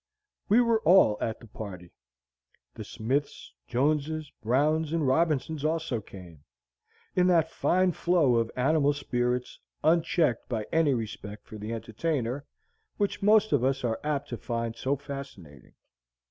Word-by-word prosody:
We 220 +5 +6
were 230 -2 +2
all 170 - +6
at 110 - -2
the - - -13
party. 95 -5 -9 0.8
The - - -7
Smiths, 135 +6 -3
Joneses, 150 +4 0
Browns, 150 +7 +1
and 165 -3 +1
Robinsons 155 +1 +1
also 160 -7 -1
came, 90 -7 -13 0.7
in 180 0 +4
that 165 -3 +3
fine 185 0 +2
flow 165 -8 +2
of 115 -1 +1
animal 145 +2 +2
spirits, 125 -3 -2 0.2
unchecked 165 - +2
by 110 -4 -2
any 155 -4 +3
respect 105 -2 -6
for 110 - -10
the 105 +2 -5
entertainer, 125 +3 -3 0.5
which 205 0 -1
most 215 +1 +4
of 140 -4 +2
us 135 0 0
are 115 -2 -1
apt 145 -1 -2
to 120 - -4
find 115 -1 -3
so 130 +4 -1
fascinating. 135 - -10
140 Hz, 140 wpm, -28 LUFS, 115-160 Hz, 0.8 s, We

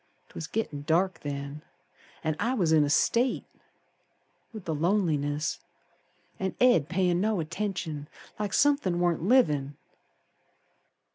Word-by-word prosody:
'Twas 160 - -7
gittin' 160 -10 -3
dark 170 +3 +1
then, 140 0 -5 0.6
An' 155 -1 0
I 235 +5 0
was 175 -9 +1
in 155 -2 +5
a 145 - 0
state, 240 - +2 1.1
With 215 -5 -9
the 160 - -1
loneliness 155 -4 0 0.8
An' 190 -1 -2
Ed 240 - +4
payin' 180 -1 +1
no 215 -2 +1
attention 165 -4 -4 0.3
Like 210 -2 -2
somethin' 280 -12 +2
warn't 175 -3 +1
livin'. 150 - +2
175 Hz, 120 wpm, -28 LUFS, 150-205 Hz, 1.1 s, in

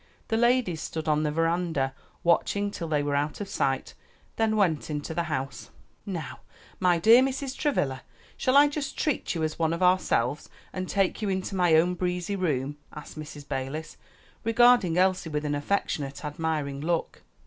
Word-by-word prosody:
The 225 - +1
ladies 235 -8 +2
stood 160 0 -5
on 150 0 +2
the 155 - 0
veranda, 165 -3 0 0.3
watching 200 +4 +2
till 170 -4 -5
they 150 -2 +1
were 145 0 -1
out 145 +1 -1
of 205 - -4
sight, 200 - -1 0.4
then 220 -1 +1
went 175 -9 +1
into 150 +1 -3
the 170 +1 -1
house. 135 -2 -4 0.4
"Now, 170 -8 -5 0.4
my 180 -2 +3
dear 225 +8 +7
Mrs. 270 0 -2
Travilla, 135 - 0 0.3
shall 260 +2 +2
I 290 +1 +8
just 290 -2 -4
treat 295 - -1
you 165 - -1
as 155 +1 -2
one 165 0 +2
of 170 +2 -2
ourselves, 150 -7 +2 0.2
and 185 -1 -4
take 195 +2 +1
you 210 - -1
into 190 +1 -2
my 175 -3 +4
own 175 +3 +4
breezy 180 +2 -2
room?" 145 -6 -1
asked 150 - -10
Mrs. 150 -2 -9
Balis, 135 +3 -4 0.5
regarding 230 -6 +4
Elsie 185 -2 +2
with 150 0 -2
an 145 - 0
affectionate, 145 -2 -2
admiring 150 -2 -2
look. 170 +2 -2
170 Hz, 170 wpm, -27 LUFS, 150-200 Hz, 0.5 s, I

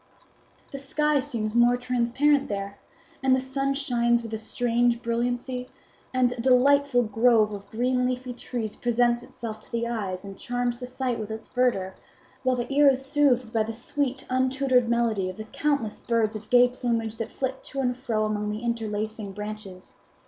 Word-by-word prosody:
"The 275 - -6
sky 300 +2 +1
seems 220 -4 -3
more 240 +1 +5
transparent 250 +4 +1
there, 200 -1 -4 0.4
and 265 -1 +4
the - - +1
sun 275 +1 -1
shines 235 -4 +2
with 225 -1 -7
a 220 - -2
strange 240 +1 +1
brilliancy, 245 +2 -2 0.4
and 255 -1 +2
a 245 -1 -4
delightful 265 +1 +4
grove 225 0 +3
of 200 0 -8
green 250 +3 +1
leafy 255 0 -3
trees 235 -3 -5
presents 240 0 +2
itself 220 -3 -8
to - - -18
the 235 0 -1
eyes 200 -5 -3
and 195 -1 -9
charms 245 -1 -2
the 250 - -6
sight 250 -2 -2
with 215 -1 -5
its 220 0 -6
verdure, 235 -7 +1 0.5
while 255 -1 +2
the 245 +2 -3
ear 290 +1 +6
is 265 0 0
soothed 270 -5 +2
by 225 - +2
the 220 +1 -2
sweet 270 +2 -2
untutored 260 -1 +2
melody 230 -5 +1
of 185 - -8
the 215 - -5
countless 280 -1 -1
birds 225 -2 +1
of 215 0 -8
gay 245 0 +7
plumage 230 -3 -2
that 225 - -4
flit 265 0 -3
to 275 - -5
and 250 -2 +1
fro 230 -4 -1
among 210 -1 -1
the 210 +2 -4
interlacing 215 -3 -3
branches. 210 -2 -8
240 Hz, 180 wpm, -26 LUFS, 220-255 Hz, 0.5 s, gay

